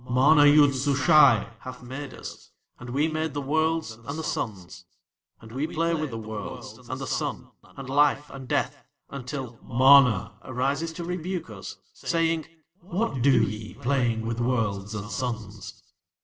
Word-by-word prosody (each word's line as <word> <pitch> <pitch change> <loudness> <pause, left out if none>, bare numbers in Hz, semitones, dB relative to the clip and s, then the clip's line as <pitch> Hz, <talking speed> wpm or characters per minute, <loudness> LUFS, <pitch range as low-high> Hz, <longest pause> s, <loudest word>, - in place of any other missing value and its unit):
"MANA 145 +4 +6
YOOD 145 -1 +6
SUSHAI 135 -4 +4
hath 130 -1 -9
made 135 +2 -7
us, - - -10 0.3
and 125 - -9
We 140 +5 +1
made 155 -2 -3
the - - -1
Worlds 160 0 0
and 115 +7 -8
the 160 - -4
Suns. 95 - -5 0.5
"And 110 - -13
We 135 +6 -2
play 165 +1 0
with 155 -2 -1
the 115 - -6
Worlds 110 -2 -7
and - - -4
the - - -4
Sun - - -3
and 135 -1 -11
Life 145 +1 +2
and 135 -2 -9
Death - - -1 0.3
until 130 -3 -6
MANA 125 -6 +5
arises 135 +6 -1
to 170 +1 -6
rebuke 180 -4 -4
us, 100 -2 -8 0.2
saying: 165 -1 0 0.3
'What 180 - -2
do 130 -3 +5
ye 105 0 -4
playing 120 -4 0
with 115 +1 -3
Worlds 110 -4 -1
and 105 0 -6
Suns?' 110 -6 -5
130 Hz, 155 wpm, -26 LUFS, 115-150 Hz, 0.5 s, MANA